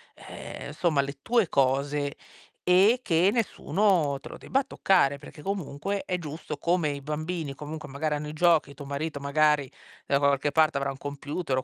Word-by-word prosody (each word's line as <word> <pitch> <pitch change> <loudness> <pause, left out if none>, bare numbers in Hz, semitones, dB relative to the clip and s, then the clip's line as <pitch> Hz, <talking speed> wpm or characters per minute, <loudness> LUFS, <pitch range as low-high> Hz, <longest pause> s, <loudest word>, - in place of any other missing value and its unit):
ehm, - - -9
insomma 150 -1 +1
le 140 0 -5
tue 230 -5 +2
cose, 140 +2 +1 0.5
e 195 +7 +5
che 175 0 +3
nessuno 185 - +1
te - - -10
lo - - -9
debba 270 +1 0
toccare, 145 - +2
perché 150 +1 -12
comunque 195 0 -3
è 180 - -1
giusto, 155 -1 -6
come 170 0 +1
i 140 -1 -4
bambini 155 +1 -3
comunque 150 +1 -7
magari 150 +2 -1
hanno 150 +1 -4
i - - -7
giochi, 160 -3 +3
tuo 140 - -9
marito 145 +2 -3
magari 145 -1 +2 0.4
da 140 - +3
qualche 140 0 +2
parte 155 -1 +3
avrà 140 0 -1
un 135 - -9
computer 145 +1 -3
o 130 - 0
150 Hz, 175 wpm, -27 LUFS, 140-175 Hz, 0.5 s, e